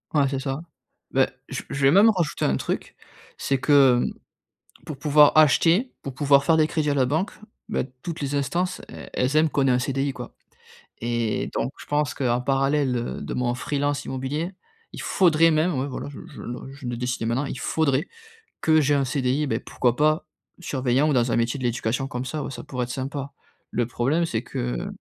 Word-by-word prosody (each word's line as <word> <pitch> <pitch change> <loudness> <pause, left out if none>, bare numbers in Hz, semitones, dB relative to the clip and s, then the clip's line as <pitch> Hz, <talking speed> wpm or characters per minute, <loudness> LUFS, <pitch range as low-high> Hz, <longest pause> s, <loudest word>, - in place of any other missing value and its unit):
Ouais 140 -2 +4
c'est 135 0 -2
ça. 135 +2 -3 0.5
Beh, - - +3 0.2
je - - -4
v - - -21
je 140 0 0
vais 135 - +6
même 200 +7 +7
rajouter 175 -8 -1
un 65 - +2
truc, - - -4 0.4
c'est 135 -1 0
que 135 -3 +5 0.8
pour 150 - -7
pouvoir 150 +1 +6
acheter, 165 - +4
pour 135 - -5
pouvoir 140 0 +4
faire 165 +1 +4
des 155 - +5
crédits 155 -2 -1
à - - +1
la 130 -2 +2
banque, 155 +9 -1 0.4
beh, - - -1 0.2
toutes 170 -1 -5
les 140 0 -2
instances, 170 +6 -1
e - - -9
elles 130 +4 +1
aiment 155 +1 +5
qu'on 140 -2 +1
ait - - +3
un 125 - +3
CDI, 135 +2 -1
quoi 125 -2 -9 0.7
et 120 -2 -1
donc 130 - -1
je - - -10
pense 145 0 0
qu'en 125 -2 0
parallèle, 135 0 +1
heu, 120 - -4
de - - -5
mon 120 -1 0
freelance 145 +2 -1
immobilier. 140 +7 -3 0.4
Il - - -7
faudrait 165 -3 +4
même 160 +3 +2
ouais, 135 - -1
voilà 140 +1 -5
je 145 - -10
je 140 - -11
le 120 +2 -7
je 140 -1 -11
le 120 -1 -3
décide 125 -1 -2
maintenant, 125 +5 0
il 135 - -5
faudrait 150 +2 +1 0.5
que 160 0 +4
j'ai 145 0 +2
un 140 - +2
CDI, 130 +2 0
beh, - - 0
pourquoi 125 -2 0
pas 155 +3 +2 0.3
surveillant 135 -2 +1
ou - - +2
dans 120 -2 +2
un - - +2
métier 115 +3 0
de - - -6
l'éducation 120 +2 -1
comme 125 -2 -4
ça. 150 +3 -3
Ouais, - - -5
ça - - -7
pourrait 125 -2 -3
être 125 - -7
sympa. 140 +1 -4 0.4
Le 120 - 0
problème 135 +8 0
c'est 115 -9 -2
que - - -3
140 Hz, 210 wpm, -24 LUFS, 125-150 Hz, 0.8 s, même